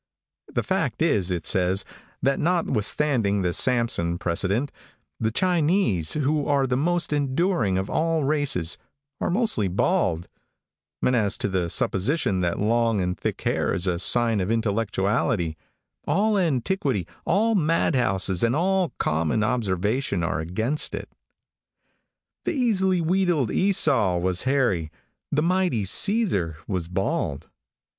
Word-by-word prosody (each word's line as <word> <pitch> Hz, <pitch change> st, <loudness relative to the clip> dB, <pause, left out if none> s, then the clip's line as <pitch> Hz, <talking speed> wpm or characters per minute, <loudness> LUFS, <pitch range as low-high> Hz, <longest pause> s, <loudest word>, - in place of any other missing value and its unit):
The -, -, -1 dB
fact -, -, -1 dB
is, 95 Hz, -3 st, +1 dB
it 85 Hz, -3 st, -3 dB
says, 95 Hz, +1 st, +1 dB, 0.4 s
that 135 Hz, +1 st, +2 dB
notwithstanding 130 Hz, -, +1 dB
the 90 Hz, -1 st, 0 dB
Samson 115 Hz, -10 st, +1 dB
precedent, 100 Hz, +11 st, -1 dB, 0.5 s
the 110 Hz, -, +1 dB
Chinese, 165 Hz, -, +1 dB
who 150 Hz, 0 st, 0 dB
are 140 Hz, -2 st, +2 dB
the 125 Hz, -1 st, 0 dB
most 170 Hz, +4 st, 0 dB
enduring 140 Hz, -, +1 dB
of 95 Hz, +1 st, -2 dB
all 160 Hz, +2 st, 0 dB
races, 135 Hz, -, 0 dB, 0.4 s
are -, -, -1 dB
mostly 190 Hz, -, +1 dB
bald; 85 Hz, -2 st, 0 dB, 0.8 s
and 125 Hz, -, +3 dB
as 105 Hz, -4 st, 0 dB
to -, -, -1 dB
the 95 Hz, -3 st, -1 dB
supposition 95 Hz, -, +1 dB
that 85 Hz, -1 st, -1 dB
long 115 Hz, 0 st, +1 dB
and 90 Hz, -1 st, -1 dB
thick -, -, -3 dB
hair -, -, 0 dB
is 85 Hz, -, -2 dB
a 90 Hz, -2 st, 0 dB
sign 115 Hz, +2 st, +2 dB
of 95 Hz, +1 st, -1 dB
intellectuality, 105 Hz, -5 st, 0 dB, 0.5 s
all 215 Hz, +2 st, +2 dB
antiquity, 145 Hz, -, 0 dB, 0.2 s
all 220 Hz, +5 st, +2 dB
madhouses 125 Hz, -, +1 dB
and 115 Hz, +2 st, +2 dB
all 185 Hz, +2 st, +1 dB
common 80 Hz, +7 st, 0 dB
observation 105 Hz, -2 st, -1 dB
are 75 Hz, -2 st, -1 dB
against 110 Hz, -, -1 dB
it. -, -, -8 dB, 1.3 s
The -, -, -1 dB
easily 190 Hz, -, +1 dB
wheedled 170 Hz, -, +1 dB
Esau 145 Hz, -, +2 dB
was 90 Hz, +1 st, -1 dB
hairy. 125 Hz, -, +1 dB, 0.4 s
The 150 Hz, +1 st, +1 dB
mighty 180 Hz, -, +1 dB
Caesar 105 Hz, -, +1 dB
was 90 Hz, -4 st, -3 dB
bald. 95 Hz, -, -2 dB
115 Hz, 130 wpm, -24 LUFS, -, 1.3 s, and